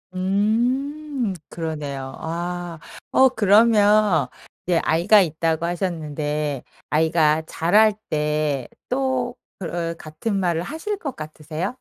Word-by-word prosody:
음 240 +6 0 0.2
그러네요. 145 -5 -5
아. 175 0 -4 0.3
어 265 0 +6
그러면 210 - +4 0.4
이제 175 -2 +2
아이가 185 +6 +5
있다고 165 0 0
하셨는데 150 -5 -2 0.3
아이가 160 0 +3
자랄 210 +6 +4 0.2
때 150 -3 0 0.2
또 255 -1 -1 0.3
그 170 -1 -3
같은 155 +7 -4
말을 170 -3 0
하실 330 - -4
것 280 -9 -6
같으세요? 155 - -5
175 Hz, 210 characters per minute, -22 LUFS, 155-215 Hz, 0.4 s, 어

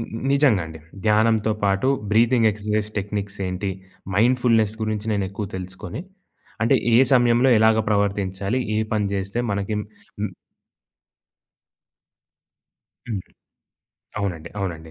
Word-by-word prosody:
ని - - -3 0.3
నిజంగా 135 - +4
అండి. 80 0 -10 0.2
ధ్యానంతో 110 0 +3
పాటు, 100 +6 +2 0.2
బ్రీతింగ్ 115 +1 +4
ఎక్సర్సైజెస్ 105 0 -2
టెక్నిక్స్ 100 0 -4
ఏంటి? 90 +2 -2 0.5
మైండ్‌ఫుల్‌నెస్ 115 -2 +3
గురించి 110 0 -2
నేనెక్కువ 100 0 -2
తెలుసుకొని, 95 - -6 0.6
అంటే 115 +4 +4 0.2
ఏ - - +7
సమయంలో 120 +1 +4
ఎలాగా 110 0 +4
ప్రవర్తించాలి? 100 +1 0 0.2
ఏ - - +2
పని 105 -2 +1
చేస్తే 100 +3 -3
మనకి 100 +1 -2
హ్మ్. 105 0 -8 2.8
హ్మ్. 105 -4 -2 1.0
అవునండి. 85 -5 -3
అవునండి. 80 -4 -5
105 Hz, 105 wpm, -23 LUFS, 100-110 Hz, 2.8 s, ఏ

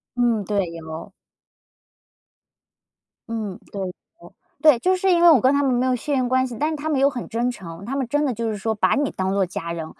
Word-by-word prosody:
嗯， 235 -4 +1
对， 205 -2 0
有。 160 -1 -8 2.2
嗯， 215 -4 -4
对 200 - -5
的。 180 - -5 0.7
对， 300 -6 +6
就 370 +5 +2
是 380 +1 +1
因 345 -1 +4
为 345 - +9
我 275 -8 +6
跟 260 +4 +4
他 285 - +2
们 270 - +2
没 250 +1 +1
有 255 - +2
血 290 +5 -4
缘 255 -2 +1
关 260 0 +2
系， 240 -2 -7
但 305 - +1
是 310 - -3
他 300 +2 -4
们 295 -4 +1
又 275 - +5
很 255 -4 -5
真 235 +2 -1
诚， 180 -5 -9
他 255 - -4
们 265 -3 -1
真 290 +3 +1
的 265 - 0
就 230 +1 -2
是 215 - -3
说 220 +3 -2
把 210 - +2
你 285 -1 0
当 190 0 -2
做 200 -1 +2
家 170 -1 -5
人， 165 -2 -5
245 Hz, 250 characters per minute, -22 LUFS, 200-280 Hz, 2.2 s, 为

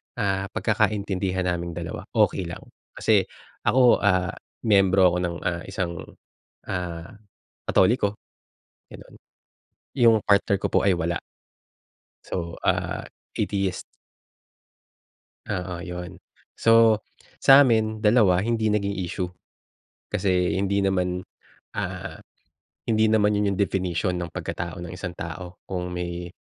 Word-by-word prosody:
ah, 100 -3 -1
pagkakaintindihan 100 -4 0
naming 85 -1 -2
dalawa, 85 -1 -6
okey 90 - +2
lang. 85 - -8 0.3
Kasi - - +2 0.4
ako, 125 -1 +5
ah, 95 -3 +2 0.3
miyembro 95 -4 +5
ako 90 - -1
ng, 85 -1 -2
ah, 85 -1 -1
isang, 95 -4 -3 0.7
ah, 90 -2 -4 0.6
Katoliko, 105 +1 +3 0.8
gano'n. - - -13 0.8
Yung 115 -2 +6
partner 100 -1 +3
ko - - +2
po - - +3
ay 95 - +4
wala. 85 +1 -1 1.1
So, 85 -2 -4
ah, - - 0 0.3
Atheist. 100 -2 -1 1.7
Oo, 90 -3 -4
yun. 90 0 -7 0.4
So, 115 -1 +5 0.4
sa'min 115 -6 +6
2 105 -5 +4
hindi 110 +1 0
naging 100 -1 0
issue. 90 +1 -3 0.8
Kasi 90 -2 +1
hindi 100 0 0
naman, 90 -1 0 0.5
ah, - - -5 0.7
hindi 110 -1 +3
naman 105 -1 +3
yun 105 -1 +1
yung - - -7
definition 90 -3 0
ng 85 -2 -4
pagkatao 85 0 -5
ng 85 0 -7
isang 90 0 -6
tao 90 +2 -7
kung 90 -1 -4
may, 85 0 -5
95 Hz, 115 wpm, -25 LUFS, 90-105 Hz, 1.7 s, Yung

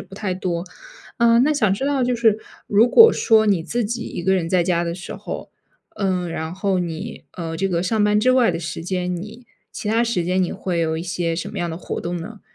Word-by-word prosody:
不 195 - -12
太 195 -2 -3
多。 180 -2 -3 0.5
啊， 235 -1 +5
那 280 +5 +4
想 215 -10 +2
知 265 - -3
道 280 -2 +1
就 245 0 +1
是 225 -2 +3 0.3
如 215 +4 +4
果 460 - +8
说 220 -2 +4
你 195 -5 +2
自 235 +7 -2
己 235 +3 -3
一 - - -5
个 190 +2 +2
人 170 -3 -1
在 180 0 +3
家 170 -1 +1
的 170 0 -2
时 180 +2 -8
候， - - -7 0.5
嗯， 185 -4 -1
然 160 0 -4
后 190 -1 0
你 165 -2 -5
呃， 165 -2 -5
这 195 - 0
个 170 -2 0
上 215 +3 +1
班 210 0 +3
之 255 +4 +3
外 250 -5 +4
的 165 - -3
时 165 0 -5
间， 180 0 -2
你 215 +7 -8 0.2
其 - - -7
它 225 +2 +2
时 230 -7 0
间 185 +2 +1
你 180 - -1
会 175 -3 -2
有 160 -1 0
一 - - -4
些 170 -1 -2
什 180 +4 -4
么 205 - -5
样 175 -1 -2
的 160 - -5
活 - - -5
动 175 +1 -3
呢？ 200 +5 -8
190 Hz, 265 characters per minute, -21 LUFS, 170-220 Hz, 0.5 s, 果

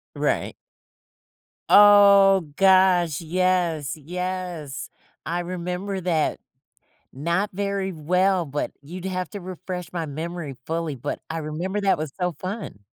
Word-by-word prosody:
Right. - - -1 1.2
Oh 200 -3 +7
gosh! 185 -4 +4
Yes! 170 -3 0
Yes! 180 -2 -5 0.4
I 175 +1 -1
remember 180 +2 -4
that. 170 -4 0 0.7
Not 170 +9 -1
very 200 -1 -2
well, 180 +3 +1
but 145 +1 -3
you'd 175 +5 -8
have 185 -2 -3
to 205 - -6
refresh 180 0 -6
my 170 -2 -3
memory 155 0 -5
fully, 165 -3 -2
but 135 +4 -4
I 165 - -4
remember 175 +7 -3
that 195 -1 +3
was 155 -2 -4
so 180 -1 0
fun. 185 - -6
180 Hz, 120 wpm, -24 LUFS, 160-190 Hz, 1.2 s, Oh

